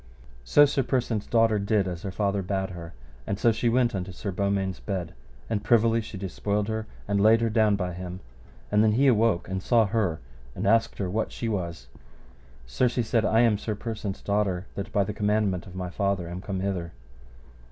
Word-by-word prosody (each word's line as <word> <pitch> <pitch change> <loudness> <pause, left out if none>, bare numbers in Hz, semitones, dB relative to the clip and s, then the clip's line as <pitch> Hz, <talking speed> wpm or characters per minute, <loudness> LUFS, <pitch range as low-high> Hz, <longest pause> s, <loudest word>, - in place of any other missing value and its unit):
So 145 - +6
Sir 140 -1 +1
Persant's 120 -5 -1
daughter 115 -2 +3
did 100 -1 +1
as 90 -2 -5
her 100 - -4
father 100 +1 0
bade 95 0 -2
her, 85 -2 -8 0.3
and 100 - -1
so 115 +3 +4
she 115 +2 0
went 120 0 +2
unto 95 0 -4
Sir 95 +2 -5
Beaumains' 95 0 -1
bed, 95 -4 -4 0.3
and 105 -2 -2
privily 115 0 +3
she 110 -2 -8
dispoiled 100 +2 -2
her, 110 0 -3 0.2
and 100 0 +1
laid 110 +2 +6
her 115 -1 +1
down 110 -2 +3
by 90 -2 -3
him, 90 0 -6 0.5
and 105 - +4
then 110 -1 +4
he 135 +6 +3
awoke 115 -8 +3
and 95 0 -3
saw 115 +2 +3
her, 100 -7 0 0.4
and - - -3
asked 115 +3 +3
her 100 - -2
what 110 +5 -2
she 115 - -4
was. 85 - -3 0.8
Sir, - - +1
she 120 0 -1
said, 115 0 +1
I 110 +2 +4
am 110 -4 +3
Sir 110 -1 -3
Persant's 105 -3 -5
daughter, 100 -3 0
that 100 - -5
by 100 - +2
the 105 - -4
commandment 105 -3 0
of 90 - -11
my 90 -1 -4
father 100 -3 -1
am 90 +2 -6
come 95 -2 -4
hither. 90 -4 -3
100 Hz, 205 wpm, -26 LUFS, 95-110 Hz, 0.8 s, So